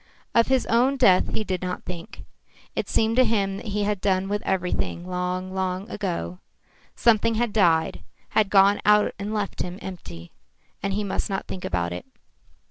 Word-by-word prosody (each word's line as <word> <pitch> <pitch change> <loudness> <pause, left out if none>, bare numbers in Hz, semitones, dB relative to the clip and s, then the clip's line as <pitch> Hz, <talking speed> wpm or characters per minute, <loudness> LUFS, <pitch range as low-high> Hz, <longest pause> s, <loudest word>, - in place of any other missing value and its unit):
Of 230 - +4
his 265 -1 +2
own 250 +4 +3
death 190 -8 +4
he 220 - 0
did 185 -3 -3
not 180 0 -4
think. 170 -2 -8 0.5
It - - -2
seemed 225 +1 +1
to 255 - +7
him 200 -4 0
that 220 - -8
he 205 0 -1
had 205 -2 -1
done 190 -1 +1
with 205 0 -1
everything 180 -1 -1
long, 180 +1 -3
long 190 +1 -2
ago. 170 - -3 0.6
Something 230 0 +3
had 230 -1 0
died, 165 -6 +2 0.3
had 215 -3 +2
gone 200 +1 +5
out 210 0 +4
and 200 +1 -4
left 210 -2 -2
him 180 0 -4
empty, 85 - -9 0.5
and 195 0 -1
he 210 +1 -1
must 200 +2 -2
not 195 -1 -2
think 185 - -7
about 85 -1 -1
it. 90 - -7
195 Hz, 180 wpm, -25 LUFS, 180-210 Hz, 0.6 s, to